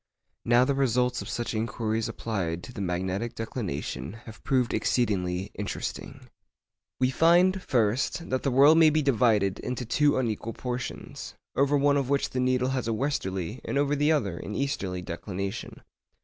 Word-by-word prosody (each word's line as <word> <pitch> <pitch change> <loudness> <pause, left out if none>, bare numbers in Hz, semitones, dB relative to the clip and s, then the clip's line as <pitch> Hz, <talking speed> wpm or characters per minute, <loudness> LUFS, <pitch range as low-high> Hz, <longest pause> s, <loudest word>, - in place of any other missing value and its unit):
Now 120 +2 +5
the 140 - +1
results 125 -2 +1
of - - -7
such 120 0 -3
inquiries 110 0 -1
applied 90 -6 -3
to 125 - -9
the 100 - -5
magnetic 95 +5 -2
declination 90 - -4
have 110 -1 -12
proved 125 -3 +1
exceedingly 95 -6 0
interesting. - - -5 0.7
We 130 0 +2
find, 175 +5 +4
first, 125 +5 0
that 130 - +1
the 140 - 0
world 140 +5 +6
may 160 -1 +7
be 155 0 +1
divided 110 -7 +2
into 125 0 -4
two 145 +5 +2
unequal 115 -2 -2
portions, 120 - -6 0.2
over 140 +1 +3
one 145 0 +3
of 135 -2 -1
which 140 0 +1
the 130 - -2
needle 130 0 +2
has 130 -3 -2
a 115 - +1
westerly, 110 - -2
and - - -2
over 145 +1 +2
the 145 +2 +2
other 100 - 0
an 105 - -6
easterly, 95 -10 -2
declination. 95 +2 -5
120 Hz, 165 wpm, -27 LUFS, 100-140 Hz, 0.7 s, may